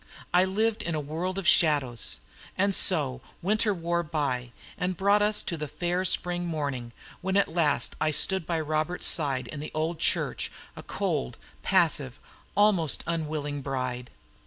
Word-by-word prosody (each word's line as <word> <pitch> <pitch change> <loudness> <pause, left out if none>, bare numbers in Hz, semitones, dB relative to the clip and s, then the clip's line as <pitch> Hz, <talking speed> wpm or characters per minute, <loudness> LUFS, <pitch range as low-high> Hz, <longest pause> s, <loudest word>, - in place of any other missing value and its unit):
I 180 +1 +5
lived 215 +3 0
in 170 -5 -2
a - - -1
world 165 +6 -4
of 195 -3 -3
shadows. 150 - +3 0.4
And 200 +1 +2
so 140 -10 +4 0.2
winter 215 +3 +2
wore 170 -2 -1
by, 140 -7 -2 0.2
and 185 -2 -2
brought 200 +2 +3
us 210 0 +2
to 170 - -3
the 150 0 -4
fair 175 +4 -2
spring 175 0 +2
morning 140 -7 -3 0.3
when 190 +1 0
at 200 - +3
last 155 -4 +1
I 155 - +2
stood 185 +3 +2
by 165 -2 -1
Robert's 155 +3 -2
side 135 -6 +3
in 150 - -7
the 150 - -6
old 160 +1 -2
church, - - 0 0.2
a - - -8
cold, 60 - -3 0.2
passive, 155 -8 +1 0.4
almost 195 -8 +3
unwilling 150 -3 -3
bride. 130 -2 -4
165 Hz, 160 wpm, -27 LUFS, 145-185 Hz, 0.4 s, I